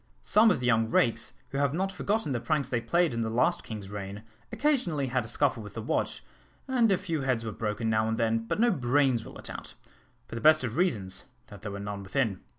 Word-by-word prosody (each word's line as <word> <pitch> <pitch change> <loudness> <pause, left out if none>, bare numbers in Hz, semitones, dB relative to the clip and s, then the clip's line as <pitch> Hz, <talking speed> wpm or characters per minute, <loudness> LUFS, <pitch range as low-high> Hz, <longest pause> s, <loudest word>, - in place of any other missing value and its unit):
Some 220 +2 +5
of 180 - +2
the 125 - -3
young 115 -2 +3
rakes, 115 -1 +2 0.2
who 135 +1 -3
have 140 +1 +1
not 190 +2 0
forgotten 200 -4 -1
the 125 - 0
pranks 140 +3 0
they 120 -3 0
played 170 +5 +2
in 115 - -1
the 110 - -1
last 125 +10 +1
king's 105 -3 -7
reign, 100 +1 -6 0.3
occasionally 230 - +1
had 125 -2 0
a - - -7
scuffle 130 0 +1
with 105 -1 -10
the 115 - -3
watch, - - -1 0.4
and 245 -5 +3
a 190 - +4
few 165 -5 -3
heads 130 -4 0
were 110 - -3
broken 105 +2 -2
now 110 0 +2
and 110 0 -1
then, 115 0 0
but - - -1
no 240 +1 +4
brains 130 - +2
were - - -11
let - - -10
out - - -8 0.5
for - - -11
the 115 - -4
best 155 -1 +6
of 120 -2 -3
reasons, 100 - 0 0.2
that 100 -2 -11
there 105 -1 -5
were 100 - -5
none 100 0 -5
within. 100 -1 -1
120 Hz, 240 wpm, -29 LUFS, 110-155 Hz, 0.5 s, best